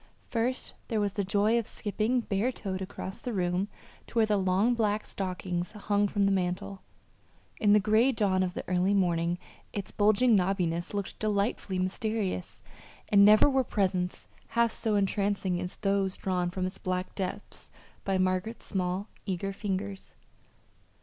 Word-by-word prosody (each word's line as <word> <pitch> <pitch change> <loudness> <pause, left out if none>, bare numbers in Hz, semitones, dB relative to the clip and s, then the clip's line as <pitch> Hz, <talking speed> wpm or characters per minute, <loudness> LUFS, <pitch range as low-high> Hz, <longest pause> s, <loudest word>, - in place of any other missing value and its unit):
First 245 +2 -1
there 225 -3 0
was 205 -2 0
the 200 - -1
joy 205 +4 +2
of 230 - -4
skipping, 220 +4 -1
bare 220 +3 0
toed, 190 -6 -5
across 190 +1 -6
the 245 - -4
room 180 0 0 0.4
to - - -7
where 225 - +5
the 215 -1 +1
long 195 +4 +2
black 215 -2 0
stockings 180 -2 -3
hung 205 -1 +1
from 200 0 0
the 195 - +3
mantel. 185 +1 -2 0.8
In 205 -1 +5
the 210 - +7
gray 215 +6 +4
dawn 200 -6 +1
of 180 -1 -1
the - - -5
early 185 +2 +2
morning 175 -2 +1 0.4
its 200 -2 -4
bulging 215 +3 +4
knobbiness 180 -2 0
looked 200 -1 -4
delightfully 205 -2 0
mysterious; 190 0 -2 0.5
and 200 -1 +7
never 210 +4 +7
were 265 -2 +2
presents 185 -5 -1 0.2
half 235 -1 +2
so 220 -2 0
entrancing 195 -2 0
as 180 0 -5
those 195 -1 0
drawn 180 -2 -1
from 185 +1 -2
its 185 - -5
black 185 -1 -2
depths 195 +1 -5 0.3
by 195 -1 +1
Margaret's 185 +4 -1
small 185 +1 -1 0.2
eager 195 +1 -2
fingers. 195 -1 -4
195 Hz, 155 wpm, -29 LUFS, 185-215 Hz, 0.8 s, the